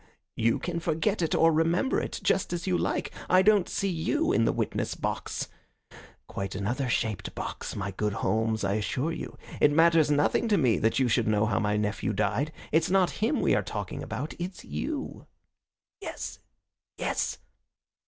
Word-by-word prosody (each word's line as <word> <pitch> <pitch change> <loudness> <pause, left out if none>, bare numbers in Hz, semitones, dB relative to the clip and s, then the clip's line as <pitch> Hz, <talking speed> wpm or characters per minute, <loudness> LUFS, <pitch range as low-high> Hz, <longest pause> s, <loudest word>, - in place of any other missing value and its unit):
"You 115 0 +2
can 170 -1 -3
forget 170 +5 0
it 165 - +1
or 165 0 +5
remember 165 +11 +2
it, - - -4
just 185 - +1
as 170 -1 -3
you 185 -2 +1
like. - - -1 0.2
I 185 +1 +6
don't 205 -2 +4
see 200 - -1
you 190 - 0
in 115 - +3
the - - +3
witnessbox. - - -2 0.8
Quite 100 -1 -4
another 120 +7 -1
shaped 110 -4 -1
box, - - -5
my 100 -1 -3
good 105 +2 -1
Holmes, 110 +2 0
I 100 0 +1
assure 125 +9 -1
you. - - -6 0.2
It - - +6
matters 165 0 +5
nothing 145 +10 +2
to 210 -2 +3
me 125 -8 +3
that 110 - +2
you 130 - +3
should 110 - +2
know 105 0 +3
how 105 -2 +1
my 105 -1 +1
nephew 105 0 -1
died. 105 +9 0 0.2
It's 160 +1 +3
not 185 -1 +3
him 235 +7 +2
we - - +3
are - - +3
talking - - -5
about. 150 - -4
It's 180 +2 -6
you." 295 -1 -4 0.7
"Yes, - - -6 0.6
yes." - - -1
150 Hz, 175 wpm, -28 LUFS, 110-175 Hz, 0.8 s, I